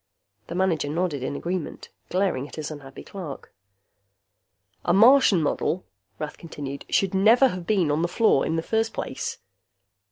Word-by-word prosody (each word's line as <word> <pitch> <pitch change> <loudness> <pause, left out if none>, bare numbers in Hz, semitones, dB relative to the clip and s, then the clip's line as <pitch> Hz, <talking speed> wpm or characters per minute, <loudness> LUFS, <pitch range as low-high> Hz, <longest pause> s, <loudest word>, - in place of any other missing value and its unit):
The 170 - -6
manager 180 -6 +1
nodded 160 -3 -1
in 130 - -3
agreement, 175 +2 -4 0.2
glaring 180 -8 0
at - - -12
his 155 -1 -5
unhappy 140 -3 -10
clerk. 175 -8 -8 1.3
"A 175 - +2
Martian 220 - +6
model," 170 +4 -1 0.3
Rath 150 +3 -6
continued, 140 -4 -7
"should 195 -1 +1
never 225 +7 +5
have 180 -4 -6
been 185 -8 +2
on 150 +2 +1
the 170 - +1
floor 175 - +3
in 160 - -1
the 165 - -1
first 225 +3 0
place." - - -4
175 Hz, 155 wpm, -25 LUFS, 150-195 Hz, 1.3 s, Martian